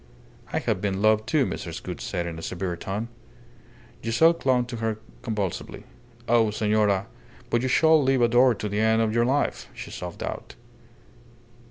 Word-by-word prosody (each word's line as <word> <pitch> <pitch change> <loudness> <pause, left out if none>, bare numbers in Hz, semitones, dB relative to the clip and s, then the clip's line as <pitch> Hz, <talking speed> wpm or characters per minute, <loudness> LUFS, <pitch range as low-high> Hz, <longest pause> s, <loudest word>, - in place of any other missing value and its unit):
"I - - -1
have 90 - -1
been 95 -1 -1
loved, 110 +1 +3
too," 150 -4 +2
Mrs. - - -5
Gould - - -6
said 85 -1 -3
in 85 -1 -5
a - - -8
severe 90 +1 -3
tone. 100 +6 -4 1.0
Giselle 140 +9 +4
clung 130 -6 +1
to 120 -1 -6
her 110 -1 -2 0.2
convulsively. 105 -6 -4 0.4
"Oh, 115 -2 +4
senora, 105 -2 +1 0.5
but 120 - +2
you 130 - 0
shall 160 +4 +5
live 135 -2 +2
adored 120 0 +4
to 105 - -2
the 105 +1 -2
end 110 +1 +3
of 110 -1 0
your 115 0 +3
life," 140 +3 0
she - - -8
sobbed 90 -1 -6
out. - - -6
110 Hz, 170 wpm, -25 LUFS, 100-125 Hz, 1.0 s, shall